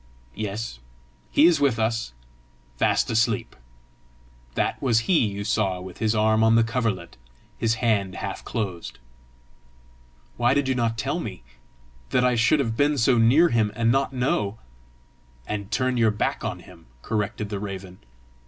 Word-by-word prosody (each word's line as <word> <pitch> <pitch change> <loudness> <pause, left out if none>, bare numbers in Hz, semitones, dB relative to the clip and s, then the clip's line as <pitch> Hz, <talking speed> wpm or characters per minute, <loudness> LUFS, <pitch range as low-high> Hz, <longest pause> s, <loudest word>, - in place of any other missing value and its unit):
"Yes; 105 - -5 0.5
he 150 - +5
is 170 -3 +5
with 140 -5 +2
us, 110 - -1 0.6
fast - - +1
asleep. 115 -1 0 1.0
That - - -1
was 115 -4 +2
he 160 - +2
you 100 0 -5
saw 100 -3 0
with 90 0 -10
his 110 0 +1
arm 110 0 +3
on 110 0 +5
the 115 - +5
coverlet, 115 -7 -2 0.4
his 115 0 +1
hand 105 -5 0
half - - -5
closed." 95 -6 -4 1.4
"Why 120 +2 +3
did 140 -1 +1
you 130 - +2
not 115 -2 -1
tell 105 - -2
me? - - -7 0.7
That 125 - +2
I 125 - +3
should 115 +6 +3
have 115 -5 -1
been 145 +3 +2
so 120 0 +3
near 140 +10 +5
him, 110 -3 +1
and 115 +1 +2
not 135 +2 +1
know!" 115 -5 -1 0.9
"And 100 -1 -4
turn 130 +3 0
your 115 -2 +4
back 105 0 -2
on - - -4
him!" - - -16 0.2
corrected 105 0 -2
the 100 -2 -3
raven. 95 -2 -7
115 Hz, 155 wpm, -24 LUFS, 105-125 Hz, 1.4 s, he